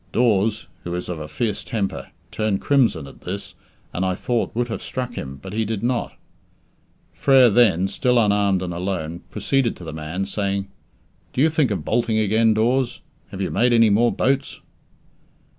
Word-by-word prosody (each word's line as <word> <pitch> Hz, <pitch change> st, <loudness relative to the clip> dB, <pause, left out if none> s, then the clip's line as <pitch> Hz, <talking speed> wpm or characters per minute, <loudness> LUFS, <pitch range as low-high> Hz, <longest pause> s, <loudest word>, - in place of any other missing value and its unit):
Dawes 110 Hz, -2 st, +2 dB, 0.2 s
who 85 Hz, 0 st, -4 dB
is 90 Hz, -, -4 dB
of 85 Hz, -3 st, -4 dB
a 75 Hz, -, -6 dB
fierce 100 Hz, +7 st, -2 dB
temper 105 Hz, -5 st, -3 dB, 0.2 s
turned 110 Hz, -3 st, 0 dB
crimson 120 Hz, -, +2 dB
at 70 Hz, -, -14 dB
this 100 Hz, +3 st, -6 dB, 0.4 s
and, 90 Hz, -, -1 dB
I 95 Hz, -1 st, 0 dB
thought, 120 Hz, +4 st, -1 dB
would 120 Hz, +1 st, 0 dB
have 115 Hz, -, -5 dB
struck 125 Hz, -1 st, -4 dB
him, 70 Hz, -, -6 dB
but 95 Hz, +8 st, -9 dB
he 110 Hz, +1 st, 0 dB
did 110 Hz, -1 st, -3 dB
not. 120 Hz, 0 st, -1 dB, 1.0 s
Frere 130 Hz, -4 st, +5 dB
then 100 Hz, -5 st, +4 dB
still 125 Hz, +5 st, +1 dB
unarmed 100 Hz, -4 st, +2 dB
and 90 Hz, -1 st, -4 dB
alone 85 Hz, -2 st, -3 dB
proceeded 135 Hz, -4 st, 0 dB
to -, -, -12 dB
the 80 Hz, -, -6 dB
man, 80 Hz, +5 st, -4 dB
saying, 100 Hz, 0 st, -2 dB, 0.6 s
"Do 130 Hz, -, 0 dB
you 160 Hz, -, +5 dB
think 155 Hz, -5 st, +2 dB
of 95 Hz, -7 st, -3 dB
bolting 115 Hz, -1 st, +1 dB
again, 110 Hz, +1 st, +3 dB
Dawes? 120 Hz, +3 st, +1 dB, 0.3 s
Have 95 Hz, -, -7 dB
you 95 Hz, -, -1 dB
made 120 Hz, 0 st, +3 dB
any 115 Hz, -2 st, +5 dB
more 115 Hz, +4 st, +4 dB
boats?" 135 Hz, +1 st, 0 dB
105 Hz, 175 wpm, -22 LUFS, 95-120 Hz, 1.0 s, Frere